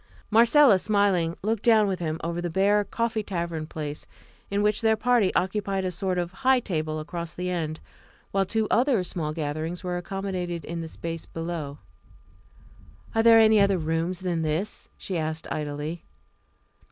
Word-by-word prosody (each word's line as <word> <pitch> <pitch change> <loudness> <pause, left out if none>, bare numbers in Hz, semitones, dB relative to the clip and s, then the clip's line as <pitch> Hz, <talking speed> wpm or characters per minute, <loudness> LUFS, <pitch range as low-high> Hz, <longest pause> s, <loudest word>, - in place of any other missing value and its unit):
Marcella, 230 0 +6
smiling, 195 -5 +1
looked 220 0 0
down 220 -3 +5
with 190 -2 -1
him 160 -2 -2
over 170 +1 -2
the 175 - -2
bare 200 +4 +3
coffee 225 +2 -1
tavern 170 -5 -4
place, 150 -2 -5 0.4
in 200 +1 0
which 210 +1 +2
their 220 -1 +4
party 230 -4 +2
occupied 195 0 0
a 185 - -1
sort 185 +1 -2
of 175 -1 -2
high 260 +5 +3
table 155 -7 -2
across 170 +1 -6
the 180 0 -3
end, 160 -3 -3 0.5
while 195 0 +2
two 220 +3 0
other 245 -5 +3
small 165 -3 -3
gatherings 155 +3 -4
were 180 -1 -2
accommodated 180 -2 -4
in 170 0 -4
the 165 - -5
space 165 0 -6
below. 165 -4 -5 1.4
"Are 225 - +3
there 230 0 +7
any 220 -1 +6
other 200 -1 +4
rooms 165 +3 -2
than 175 -3 -1
this?" 160 +7 -3
she 185 -3 -3
asked 155 0 -3
idly. 150 +2 -4
180 Hz, 165 wpm, -26 LUFS, 165-210 Hz, 1.4 s, there